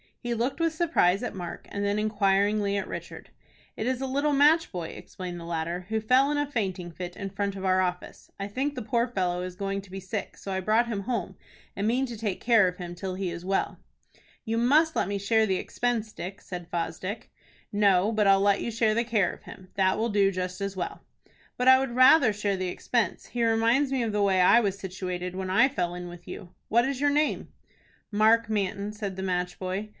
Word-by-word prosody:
He 240 -1 -3
looked 240 +7 -1
with 330 -1 +1
surprise 310 - +2
at 245 - -3
Mark, 175 -2 -7
and 200 - -3
then 200 +1 0
inquiringly 205 -1 +1
at 195 - -3
Richard. - - -8 0.5
"It 220 - -3
is 260 0 -1
a - - -1
little 285 +3 +1
match 300 +4 +4
boy," 175 -3 -4
explained 180 -2 -8
the 170 - -8
latter, 170 +2 -3
"who 220 0 0
fell 255 +6 +3
in 295 - 0
a 290 - +1
fainting 190 -8 -3
fit 175 +1 -7
in 195 -1 -6
front 200 0 -2
of 190 0 -5
our 185 0 +3
office. 180 -1 -4
I 195 - -3
think 265 +8 -2
the 250 - -4
poor 235 +2 +1
fellow 180 -6 -1
is 180 0 -5
going 195 +1 -3
to 195 - -17
be 195 - -5
sick, 190 +2 -5
so 195 - -7
I 190 - -1
brought 220 +5 +2
him 215 -4 -2
home, 200 -4 -3 0.4
and 200 +2 -1
mean 250 +4 +2
to 235 -2 -7
take 210 -3 -3
care 225 -5 +4
of 180 0 -4
him 175 -1 -6
till 185 +1 -5
he 185 -2 -3
is 170 0 -7
well." 195 +1 -1 0.7
"You 225 +1 0
must 305 +7 +4
let - - +1
me 200 0 -2
share 220 +2 +2
the 190 - +1
expense, 230 -1 -2
Dick," 190 +3 -7
said 175 -2 -7
Fosdick. 180 +4 -4 0.4
"No, 205 -1 +3
but 215 -2 +2
I'll 195 0 +5
let 200 0 +3
you - - -2
share 225 -1 +1
the 235 +2 +1
care 220 -5 +1
of - - -14
him. 185 -1 -12
That 190 -1 +2
will 230 +1 0
do 200 -2 +3
just 185 0 -4
as 200 0 -3
well." 180 - -4 0.6
"But 250 - 0
I 260 0 +8
would 265 -2 -2
rather 255 -1 +7
share 205 -1 -1
the 185 -1 -2
expense. 225 +1 -1
He 240 -1 -2
reminds 230 +5 +2
me 265 -2 0
of 225 - -1
the 210 0 +1
way 190 -2 +3
I 180 +6 +7
was 200 -3 -1
situated 180 -1 -5
when 190 0 -4
I 200 +8 +5
fell 180 -11 -2
in 180 0 -6
with 175 0 -11
you. 180 - -8 0.2
What 235 +2 +4
is 275 -1 -3
your 290 0 +3
name?" 300 +1 0 0.6
"Mark 220 +2 +4
Manton," 205 0 -2
said 205 -3 -5
the 190 - -5
match 180 -1 -2
boy. 190 +3 -4
200 Hz, 230 wpm, -27 LUFS, 185-235 Hz, 0.7 s, I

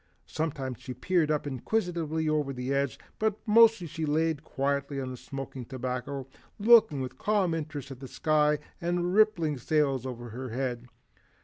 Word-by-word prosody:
Sometimes 140 -6 -3
she 125 - -6
peered 170 +3 +1
up 150 -1 0
inquisitively 160 - -1
over 150 -3 0
the 125 +1 -2
edge, 140 -3 0 0.2
but 215 -1 +1
mostly 225 -3 +6
she 160 0 -5
lay 160 +2 +2
quietly 140 -1 -2
on 130 -1 -4
the - - -5
smoking 135 0 -7
tobacco, 130 +2 -4 0.3
looking 220 - +6
with 130 - -6
calm 205 -5 +2
interest 150 -3 -5
at 130 - -8
the 135 - -8
sky 150 +1 +2 0.2
and 175 +1 0
the 175 - 0
rippling 175 -6 +3
sails 140 -2 +1
over 120 -2 -6
her 125 +3 -6
head. 125 0 -3
145 Hz, 165 wpm, -29 LUFS, 130-165 Hz, 0.3 s, mostly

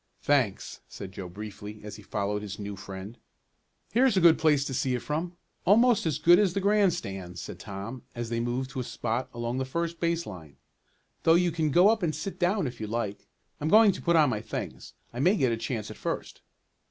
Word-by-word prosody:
"Thanks," 130 -9 +1
said 95 - -8
Joe 95 -2 -7
briefly, 105 +2 -8
as 105 0 -8
he - - -12
followed 105 +1 -2
his 105 -1 -6
new 100 -1 -5
friend. 100 +3 -9 0.7
"Here's 245 -2 +3
a - - +6
good 170 -2 +6
place 150 -3 +3
to 135 - -4
see 130 0 0
it 120 - -4
from 170 +4 -3 0.3
almost 225 -1 +4
as 150 -4 0
good 175 +4 +6
as 195 -4 +2
the - - +2
grandstand," 175 - 0
said - - -7
Tom, 100 +6 -7
as 120 -1 -4
they 115 - 0
moved 125 +3 -2
to 135 - -5
a - - -1
spot 120 0 -3
along 120 +1 -3
the - - 0
first 170 +5 -3
base 170 0 0
line. 80 -8 -10 0.7
"Though 165 - +5
you 175 0 +3
can 160 -1 0
go 175 +7 +6
up 220 -1 +2
and 160 -3 0
sit 190 +6 -5
down 185 0 +2
if 125 -3 -6
you 110 - -3
like. 105 -2 -3 0.3
I'm 150 - -1
going 215 +1 +7
to - - -7
put 170 -1 +2
on 150 -5 +5
my 105 - -2
things. - - -6 0.2
I 120 - -5
may 185 +9 +4
get 130 -5 +2
a - - +1
chance 110 -2 -4
at - - -10
first." - - -4
130 Hz, 220 wpm, -28 LUFS, 105-170 Hz, 0.7 s, going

